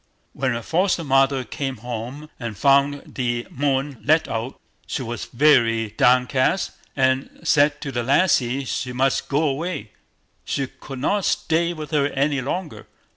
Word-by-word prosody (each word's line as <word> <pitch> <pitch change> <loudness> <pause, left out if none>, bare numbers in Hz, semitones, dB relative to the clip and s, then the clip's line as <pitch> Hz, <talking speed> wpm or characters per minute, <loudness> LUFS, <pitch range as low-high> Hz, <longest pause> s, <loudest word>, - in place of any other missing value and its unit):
When 130 -2 -1
her 115 0 -4
foster 180 - +1
mother 135 -1 +3
came 135 +2 -4
home 125 +6 -6
and 115 -5 -5
found 140 +1 +3
the 120 -2 -1
Moon 135 -1 -1
let 155 +3 +3
out, 115 +3 -4 0.3
she 130 - -3
was 120 -1 -5
very 115 -5 +3
downcast, 125 - +2 0.2
and 130 0 +1
said 145 0 +3
to 140 - -4
the 120 -2 -1
lassie 135 -1 +2
she 125 +1 -3
must 130 +1 0
go 145 +3 +1
away, 150 - -2 0.5
she 135 - -2
could 135 +1 -10
not 195 +9 0
stay 170 +1 +1
with 155 -2 -8
her 145 -2 +2
any 140 0 0
longer. 165 +6 -5
135 Hz, 150 wpm, -22 LUFS, 125-150 Hz, 0.5 s, mother